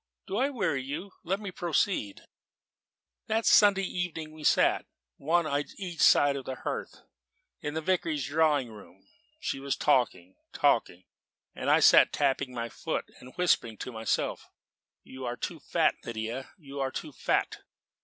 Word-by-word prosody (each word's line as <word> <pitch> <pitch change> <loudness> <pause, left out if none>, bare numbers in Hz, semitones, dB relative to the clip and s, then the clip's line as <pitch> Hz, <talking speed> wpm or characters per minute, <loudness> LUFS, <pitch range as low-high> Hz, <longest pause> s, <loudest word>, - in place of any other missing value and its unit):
Do 195 - -3
I 265 +4 +2
weary 185 - -1
you? 155 +9 -6
Let 195 +3 -1
me 205 -3 -6
proceed: 170 - -1 1.1
"That 220 0 0
Sunday 200 -2 +6
evening 175 -4 -4
we 155 -1 -11
sat, - - +3 0.3
one 165 +4 +1
on 145 -1 0
each 180 -5 -6
side 145 -1 +6
of 135 -2 -6
the 130 - -4
hearth, - - -5 0.6
in 150 +1 -4
the 160 - -1
Vicarage 160 -5 0
drawing 145 -4 +2
room. 105 -2 -15 0.3
She - - -3
was 140 0 -2
talking 120 -10 +1 0.2
talking; 90 +1 +1 0.5
and - - -3
I - - +5
sat - - +7
tapping 135 -2 0
my 115 -1 -4
foot - - -4
and 130 +1 -14
whispering 115 -11 +1
to 125 - -6
myself, 110 -1 -2 0.6
'You 130 0 -10
are 120 +1 -3
too - - -5
fat, - - +2
Lydia, 115 +3 -5
you 140 -5 -9
are 135 -1 0
too 150 +3 -6
fat.' - - 0
145 Hz, 155 wpm, -29 LUFS, 130-175 Hz, 1.1 s, sat